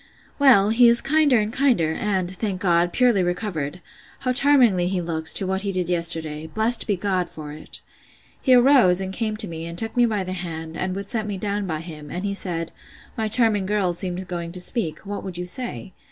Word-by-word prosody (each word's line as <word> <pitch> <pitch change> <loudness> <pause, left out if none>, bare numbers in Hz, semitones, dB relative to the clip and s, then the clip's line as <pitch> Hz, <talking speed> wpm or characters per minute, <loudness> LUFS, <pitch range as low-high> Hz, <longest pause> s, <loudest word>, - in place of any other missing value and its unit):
Well, 235 -8 +5
he 235 +2 +5
is 235 0 +3
kinder 295 -2 +2
and 210 +1 -3
kinder, 245 - +1
and, 190 -1 -2
thank 195 -2 -3
God, 175 -2 +1
purely 245 -4 +2
recovered!—How 180 - -5
charmingly 250 -10 +4
he 185 0 -2
looks, 160 -2 +1
to 195 - +5
what 190 +1 -2
he 200 0 -3
did 180 -2 -2
yesterday! 160 -3 0
Blessed 220 +8 +3
be 205 - +1
God 185 -2 -2
for 150 -2 -9
it! 155 +1 -6 0.6
He 260 -2 +4
arose, 245 -8 +5
and 190 0 -4
came 215 0 -3
to 215 - -1
me, 165 -1 -7
and 170 0 -8
took 225 +2 -1
me 240 -1 +3
by 210 -4 -2
the 185 0 -5
hand, 165 -3 -7
and 185 +1 -3
would 200 0 -6
set 215 0 -2
me 205 -2 -4
down 200 0 -3
by 155 -3 -4
him; 155 -3 -10
and 180 +3 -5
he 200 - -2
said, 170 -4 -4 0.4
My 220 -1 -2
charming 215 -3 +4
girl 200 -3 0
seemed 180 +1 -2
going 170 -2 -5
to 180 - -2
speak. 180 -1 -1
What 205 +1 -6
would 185 -3 -7
you 180 - -5
say? 200 -1 -5
190 Hz, 210 wpm, -22 LUFS, 175-220 Hz, 0.6 s, Well